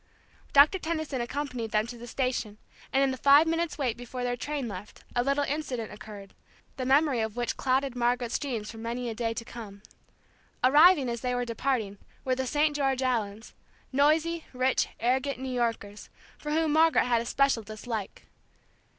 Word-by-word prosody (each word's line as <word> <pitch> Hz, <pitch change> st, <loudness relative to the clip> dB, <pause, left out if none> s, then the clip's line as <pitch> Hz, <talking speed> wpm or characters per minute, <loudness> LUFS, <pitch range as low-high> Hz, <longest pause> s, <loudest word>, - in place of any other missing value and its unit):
Doctor 295 Hz, +7 st, +6 dB
Tenison 315 Hz, -6 st, -2 dB
accompanied 250 Hz, -2 st, -3 dB
them 215 Hz, 0 st, +1 dB
to 240 Hz, +1 st, -8 dB
the 240 Hz, +1 st, -10 dB
station, 240 Hz, -5 st, -2 dB, 0.3 s
and 270 Hz, +1 st, +3 dB
in 270 Hz, -, +2 dB
the 260 Hz, -, -4 dB
five 285 Hz, +3 st, +7 dB
minutes' 330 Hz, -1 st, -1 dB
wait 255 Hz, -6 st, 0 dB
before 245 Hz, +1 st, -6 dB
their 245 Hz, 0 st, 0 dB
train 285 Hz, 0 st, -3 dB
left, 200 Hz, -1 st, -9 dB
a 245 Hz, -, +2 dB
little 275 Hz, +2 st, +1 dB
incident 275 Hz, -6 st, -3 dB
occurred, 205 Hz, -2 st, -11 dB, 0.4 s
the 255 Hz, -1 st, -3 dB
memory 275 Hz, -1 st, +3 dB
of 220 Hz, -1 st, -2 dB
which 240 Hz, -1 st, -2 dB
clouded 265 Hz, 0 st, 0 dB
Margaret's 240 Hz, -1 st, 0 dB
dreams 235 Hz, -7 st, -4 dB
for 225 Hz, -, -11 dB
many 235 Hz, +2 st, -3 dB
a -, -, -4 dB
day 230 Hz, 0 st, -2 dB
to 230 Hz, -, -5 dB
come. 210 Hz, -4 st, -10 dB, 0.8 s
Arriving, 295 Hz, +2 st, +6 dB
as 235 Hz, -1 st, -3 dB
they 250 Hz, -1 st, -1 dB
were 245 Hz, 0 st, -1 dB
departing, 230 Hz, -4 st, -2 dB, 0.3 s
were 260 Hz, -, +1 dB
the 260 Hz, 0 st, -2 dB
St. 295 Hz, +3 st, +1 dB
George 270 Hz, -2 st, 0 dB
Allens, 225 Hz, -4 st, -2 dB, 0.4 s
noisy, 315 Hz, +4 st, +2 dB
rich, 255 Hz, +1 st, +1 dB
arrogant 260 Hz, +4 st, 0 dB
New 260 Hz, 0 st, -5 dB
Yorkers, 230 Hz, -4 st, -3 dB, 0.3 s
for 300 Hz, -, -7 dB
whom 315 Hz, 0 st, +1 dB
Margaret 320 Hz, -2 st, +4 dB
had 240 Hz, -2 st, +2 dB
a -, -, -6 dB
special 275 Hz, -4 st, +2 dB
dislike. 215 Hz, -1 st, -6 dB
250 Hz, 175 wpm, -28 LUFS, 230-280 Hz, 0.8 s, five